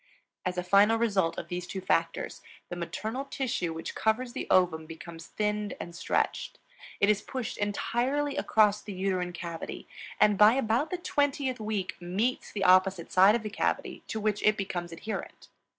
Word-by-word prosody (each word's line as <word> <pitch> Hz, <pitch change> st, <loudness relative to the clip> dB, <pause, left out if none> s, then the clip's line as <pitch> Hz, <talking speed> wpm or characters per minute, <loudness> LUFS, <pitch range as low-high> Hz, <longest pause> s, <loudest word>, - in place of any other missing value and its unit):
As 180 Hz, 0 st, -3 dB
a 180 Hz, -, 0 dB
final 200 Hz, +5 st, +5 dB
result 200 Hz, -8 st, +1 dB
of -, -, -5 dB
these 180 Hz, 0 st, -4 dB
two 190 Hz, -, -4 dB
factors, 165 Hz, -2 st, -1 dB, 0.3 s
the -, -, -4 dB
maternal 220 Hz, +9 st, -4 dB
tissue 255 Hz, -11 st, -2 dB
which 160 Hz, 0 st, -5 dB
covers 240 Hz, +3 st, 0 dB
the -, -, -4 dB
ovum 165 Hz, -4 st, +3 dB
becomes 165 Hz, 0 st, -9 dB
thinned 210 Hz, -1 st, -2 dB
and 170 Hz, -, -7 dB
stretched; -, -, -1 dB, 0.4 s
it 200 Hz, -, +4 dB
is 210 Hz, 0 st, +3 dB
pushed 255 Hz, -3 st, -4 dB
entirely 250 Hz, +7 st, 0 dB
across 210 Hz, -7 st, +3 dB
the 205 Hz, -, -7 dB
uterine 185 Hz, -1 st, -1 dB
cavity; 170 Hz, -2 st, -6 dB, 0.3 s
and 210 Hz, -2 st, +4 dB
by 210 Hz, +2 st, +8 dB
about 260 Hz, +3 st, +1 dB
the 365 Hz, -, -2 dB
twentieth 285 Hz, -6 st, 0 dB
week 210 Hz, -4 st, -3 dB
meets 200 Hz, +9 st, -1 dB
the 200 Hz, -, -2 dB
opposite 185 Hz, -1 st, +4 dB
side 190 Hz, +4 st, +6 dB
of 235 Hz, -, -2 dB
the 215 Hz, -, -5 dB
cavity, 210 Hz, -, -1 dB
to 220 Hz, -, -3 dB
which 210 Hz, -1 st, 0 dB
it 215 Hz, 0 st, +3 dB
becomes 175 Hz, -3 st, -3 dB
adherent. 215 Hz, +6 st, -6 dB
205 Hz, 170 wpm, -29 LUFS, 180-225 Hz, 0.4 s, by